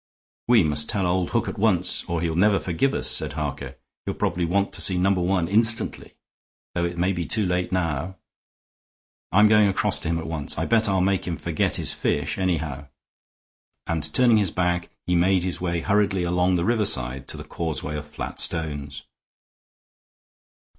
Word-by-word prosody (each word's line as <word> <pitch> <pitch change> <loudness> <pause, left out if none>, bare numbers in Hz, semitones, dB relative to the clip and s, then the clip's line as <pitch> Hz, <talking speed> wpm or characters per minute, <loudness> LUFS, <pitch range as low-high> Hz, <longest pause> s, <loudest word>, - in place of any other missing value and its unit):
"We 115 -5 +5
must 75 -1 0
tell 100 -3 -1
old 90 0 0
Hook - - -1
at - - -6
once, - - +2
or 85 -1 -3
he'll 85 -1 -1
never 100 +3 +3
forgive 95 +10 -1
us," - - -1
said - - 0
Harker. 70 -3 -5 0.3
"He'll - - -4
probably 90 -1 -1
want 100 +4 0
to - - 0
see 95 - +5
Number 95 0 +1
One 90 -1 0
instantly, 110 +4 +2 0.6
though 85 0 -1
it 85 0 -4
may 90 +3 +1
be 85 -2 -4
too 110 -2 +2
late 90 0 -1
now. 85 -1 -2 1.2
I'm 105 +4 +5
going 105 -1 +5
across 95 - +1
to - - -4
him 85 - 0
at 80 - -5
once. 80 -3 -3
I - - -1
bet 110 -2 +2
I'll 95 -1 +1
make 95 0 0
him 85 -2 -3
forget - - -1
his - - -2
fish, - - -2
anyhow." 75 -7 -2 1.0
And, 80 -2 0
turning 120 +1 +4
his 100 -4 +1
back, 90 0 -1 0.2
he 90 - 0
made 90 +1 +2
his 90 -1 -3
way 85 -2 -2
hurriedly 100 -2 +1
along 90 +1 +1
the 85 0 0
riverside 65 - +1
to - - -2
the - - -8
causeway 80 -2 -4
of 75 0 -6
flat 75 - -6
stones. 75 -4 -1
90 Hz, 180 wpm, -23 LUFS, 80-95 Hz, 1.2 s, We